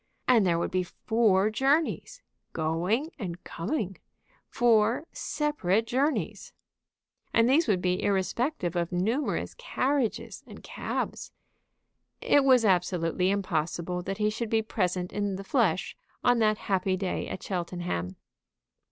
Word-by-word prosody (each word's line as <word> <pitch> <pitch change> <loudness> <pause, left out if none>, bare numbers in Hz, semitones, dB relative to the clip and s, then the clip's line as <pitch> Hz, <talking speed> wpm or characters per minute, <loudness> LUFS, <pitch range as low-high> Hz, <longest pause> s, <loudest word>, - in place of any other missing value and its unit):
"And 230 -6 +5
there 170 -1 +2
would 170 - -2
be 185 - +1
four 210 +1 +1
journeys, 295 - 0 0.3
going 175 - 0
and 180 -4 -6
coming, 195 - -3 0.5
four 235 +2 +3
separate 225 - 0
journeys!" 275 +6 -1 0.8
And 230 0 +5
these 290 +5 +4
would 190 -5 +1
be 180 0 +1
irrespective 195 - -1
of 170 0 -1
numerous 220 +11 -1
carriages 275 - -1
and - - -12
cabs. - - -4 0.9
It 285 - +4
was 255 -4 +5
absolutely 180 -1 +1
impossible 180 -2 -1
that 195 +2 -4
he 210 0 +1
should 230 +1 -4
be 220 0 +2
present 180 -4 -2
in 205 -1 -1
the 195 - -6
flesh 195 - +1 0.3
on 245 -1 +4
that 215 -1 +3
happy 190 -1 +1
day 190 -1 -2
at - - -6
Cheltenham. 175 - -3
200 Hz, 125 wpm, -28 LUFS, 180-240 Hz, 0.9 s, And